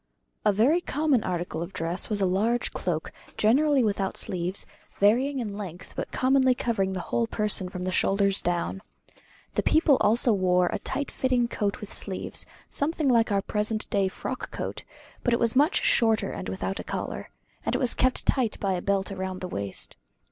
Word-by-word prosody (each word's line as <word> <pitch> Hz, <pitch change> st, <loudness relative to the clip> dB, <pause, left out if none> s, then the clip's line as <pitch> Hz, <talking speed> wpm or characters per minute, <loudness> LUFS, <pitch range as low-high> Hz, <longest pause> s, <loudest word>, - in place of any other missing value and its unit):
A -, -, +4 dB
very 255 Hz, -, +3 dB
common 290 Hz, -7 st, +1 dB
article 175 Hz, -3 st, -3 dB
of 170 Hz, +3 st, -6 dB
dress 165 Hz, +3 st, -2 dB
was 210 Hz, -2 st, +1 dB
a -, -, +4 dB
large 220 Hz, +6 st, +1 dB
cloak, 160 Hz, -3 st, -3 dB, 0.3 s
generally 275 Hz, +5 st, +4 dB
without 200 Hz, -3 st, -1 dB
sleeves, 185 Hz, 0 st, 0 dB, 0.3 s
varying 250 Hz, +8 st, +3 dB
in 215 Hz, -5 st, -3 dB
length, 185 Hz, -3 st, -8 dB
but -, -, -4 dB
commonly 260 Hz, -1 st, +3 dB
covering 195 Hz, -6 st, -1 dB
the 185 Hz, -, -3 dB
whole 230 Hz, +5 st, -1 dB
person 210 Hz, -4 st, 0 dB
from 180 Hz, -1 st, -6 dB
the 185 Hz, -, -1 dB
shoulders 195 Hz, +1 st, +2 dB
down. 175 Hz, +2 st, -1 dB, 0.7 s
The -, -, +1 dB
people 310 Hz, -4 st, +4 dB
also 230 Hz, +2 st, +4 dB
wore 180 Hz, -2 st, +2 dB
a -, -, -2 dB
tight 285 Hz, -, -3 dB
fitting 250 Hz, -2 st, +1 dB
coat 205 Hz, -2 st, -2 dB
with 210 Hz, -, -7 dB
sleeves, 190 Hz, -2 st, 0 dB, 0.2 s
something 305 Hz, 0 st, 0 dB
like 230 Hz, -3 st, +3 dB
our 200 Hz, -1 st, +1 dB
present 215 Hz, +1 st, -1 dB, 0.2 s
frock -, -, -5 dB
coat; -, -, -5 dB, 0.4 s
but 245 Hz, -2 st, +3 dB
it -, -, -2 dB
was 230 Hz, 0 st, +2 dB
much 295 Hz, +7 st, +3 dB
shorter 225 Hz, -2 st, +3 dB
and -, -, -5 dB
without -, -, -3 dB
a -, -, -4 dB
collar, -, -, -5 dB, 0.3 s
and -, -, -1 dB
it -, -, +1 dB
was 250 Hz, -3 st, +2 dB
kept 255 Hz, 0 st, +1 dB
tight 250 Hz, -5 st, +1 dB
by 195 Hz, -2 st, 0 dB
a 180 Hz, -, -2 dB
belt 200 Hz, +1 st, 0 dB
round 190 Hz, -1 st, -4 dB
the 185 Hz, -, -3 dB
waist. 100 Hz, -, -5 dB
210 Hz, 185 wpm, -26 LUFS, 190-250 Hz, 0.7 s, A